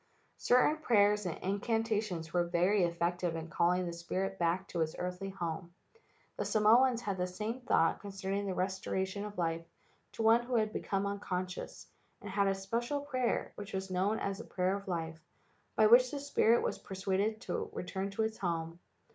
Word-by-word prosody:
Certain 250 +5 +4
prayers 210 -7 +3
and 165 - -3
incantations 205 -4 -1
were 175 -1 +3
very 180 +3 +3
effective 170 0 -1
in 165 0 -5
calling 180 +1 +2
the 170 - -4
spirit 185 +3 -3
back 175 +3 +1
to 170 - -2
its 155 -1 -1
earthly 180 +2 -4
home. 175 -2 -5 0.6
The - - -1
Samoans 235 +3 +4
had 200 -4 -2
the 180 - +1
same 215 +7 -4
thought 165 -8 +2
concerning 200 0 -3
the 190 - -1
restora¬ 190 +1 -1
tion 200 +2 -5
of 210 0 -8
life 165 -1 -1 0.5
to 225 - -3
one 225 +2 +6
who 245 +1 -3
had 215 -1 +1
become 195 0 -1
unconscious, 185 -2 -4 0.3
and 205 - -8
had 200 0 +2
a 195 - +2
special 235 +9 -2
prayer, 255 -4 -1
which 205 0 -8
was 190 0 -3
known 190 +4 +1
as 195 -1 -3
the - - -6
prayer 185 +1 0
of 200 0 -7
life, 165 -3 -3 0.6
by 215 - +5
which 245 +3 +7
the 285 - -4
spirit 240 -5 +3
was - - -2
per¬ 190 - -8
suaded 200 +3 0
to - - -3
return 190 +2 -4
into 200 +2 -1
its 220 0 -2
old 175 - +2
home. 165 0 -4
195 Hz, 190 wpm, -33 LUFS, 180-215 Hz, 0.6 s, which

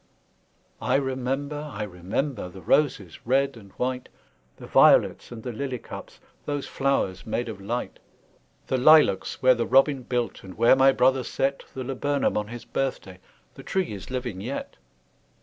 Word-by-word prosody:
I - - +1
remember, 135 +3 -2
I 105 -2 -4
remember, 100 - -3
The 95 +1 -12
roses, 105 - +1
red 135 +2 +1
and 100 -4 -14
white, 125 0 -3 0.5
The - - -10
violets, - - +4
and 115 -2 -8
the 125 - -4
lily 130 +2 -4
cups, - - -10 0.3
Those 145 -1 -2
flowers 135 -10 -1
made 120 +2 -2
of 105 -4 -7
light! 120 +5 -4 0.7
The 130 - -1
lilacs 150 -10 +4
where 130 0 +7
the 120 -1 -2
robin 135 +1 +4
built, 120 -3 -3
And 95 -1 -10
where 115 +3 +6
my 135 +1 +6
brother 130 0 +3
set 135 +2 -2
The 130 - -4
laburnum 135 +2 -1
on 105 0 -1
his 120 +1 -9
birthday, 100 -9 -3 0.3
The - - -11
tree 190 - -2
is 100 - -9
living 125 -7 -4
yet! 125 +7 -5
125 Hz, 160 wpm, -25 LUFS, 110-135 Hz, 0.7 s, where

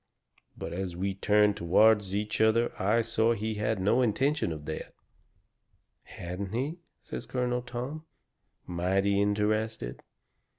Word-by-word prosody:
But - - -5
as 90 -1 -3
we 95 +2 -1
turned 105 +1 +3
toward 105 +4 +5
each 105 +3 -2
other 115 +2 +3
I 110 +5 +3
saw 115 0 +2
he 110 0 -2
had 105 0 -1
no 105 +7 +3
intention 125 - +1
of 75 -2 -6
that 80 - -3
sort." - - -25 1.1
"Hadn't 90 +3 -6
he?" 140 +9 -2 0.2
says - - -6
Colonel 125 -1 -1
Tom, 125 +6 -6 0.6
mighty 95 +3 +1
interested. 105 - 0
105 Hz, 130 wpm, -29 LUFS, 95-115 Hz, 1.1 s, toward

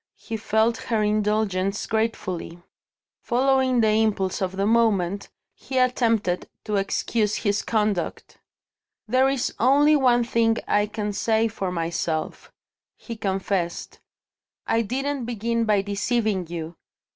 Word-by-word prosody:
He 225 - -6
felt 220 +1 +1
her 225 -3 -1
indulgence 210 -2 0
gratefully. 220 -6 -2 0.6
Following 260 0 +2
the 220 - +3
impulse 200 -4 0
of 190 0 -2
the 195 - +1
moment, 205 -4 +1 0.2
he 265 - -6
attempted 230 -7 +1
to 210 -2 -1
excuse 210 +2 0
his 205 -1 0
conduct. 210 -5 -2 0.7
"There 255 +4 +3
is 270 -2 -1
only 285 +5 +5
one 245 -4 +3
thing 230 -1 +1
I 205 0 +2
can 210 -1 -4
say 225 +2 +1
for 195 -4 -4
myself," 165 -2 -3 0.5
he 230 - -8
confessed, 190 -4 -2 0.7
"I 225 - +2
didn't 270 +3 -2
begin 230 0 -1
by 205 -3 +2
deceiving 205 -2 -1
you. 165 0 -6
215 Hz, 120 wpm, -24 LUFS, 195-235 Hz, 0.7 s, only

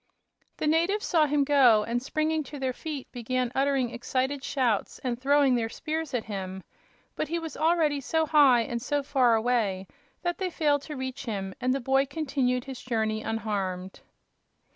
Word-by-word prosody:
The - - -2
natives 340 +7 +2
saw 315 -3 +3
him 290 0 +2
go, 260 -7 +5
and 235 +2 -2
springing 310 +3 -1
to 290 - -8
their 260 -2 -2
feet 295 -1 -6
began 250 +1 -2
uttering 270 -3 +1
excited 265 +3 -2
shouts 250 -8 0
and 245 -1 -2
throwing 280 -1 +4
their 230 -2 0
spears 315 0 -4
at 235 - -1
him. 190 -3 -6 0.5
But - - -2
he 335 - -2
was 325 -3 -6
already 315 -3 +2
so 320 +4 +1
high 285 -6 +5
and 235 +1 -3
so 290 +2 -1
far 255 -4 +3
away 220 -5 0 0.4
that 350 0 -2
they 375 -1 -1
failed 295 -4 +1
to 300 - -4
reach 260 +1 -5
him, 195 -4 -4
and 255 +1 +1
the 270 - +1
boy 270 +2 +2
continued 270 -4 -1
his 265 -2 -8
journey 220 -3 -1
unharmed. 200 -4 -3
265 Hz, 175 wpm, -27 LUFS, 235-295 Hz, 0.5 s, go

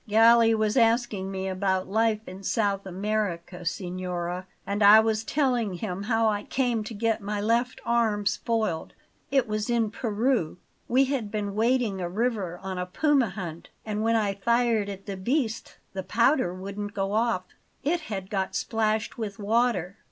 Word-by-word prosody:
Galli 225 +1 +6
was 215 +2 +1
asking 225 -5 +2
me 190 0 -3
about 190 0 0
life 220 +1 +1
in 185 +1 -8
South 200 -1 0
America, 190 -2 -3
signora; 180 0 -3 0.2
and 200 +1 -2
I 210 +2 +9
was 220 0 +1
telling 245 -7 0
him 180 0 -4
how 225 +1 +2
I 205 -1 +1
came 240 -2 0
to 220 - -6
get 225 +1 0
my 205 +1 -3
left 235 +4 +1
arm 225 -3 +1
spoiled. 215 -7 -1 0.3
It 270 -3 +2
was 215 +1 -2
in 230 -3 +1
Peru. 225 -6 0 0.3
We 260 +3 +4
had 260 -6 -1
been 205 -2 -3
wading 225 -3 +1
a 175 - -2
river 205 -4 -1
on 190 -1 -4
a 180 - -3
puma 275 +3 +2
hunt, 175 -4 -7 0.2
and 210 -1 -2
when 225 +1 +2
I 210 -3 +1
fired 230 0 +1
at 195 -1 -8
the 195 -2 -5
beast 230 +2 -2 0.2
the 190 - -3
powder 230 - +2
wouldn't 200 +3 -6
go 195 0 -1
off; 220 -3 +1 0.4
it 335 +5 +1
had 195 -2 -5
got 190 -2 -1
splashed 220 0 -1
with 205 -3 -4
water. 210 -4 0
215 Hz, 165 wpm, -26 LUFS, 190-230 Hz, 0.4 s, I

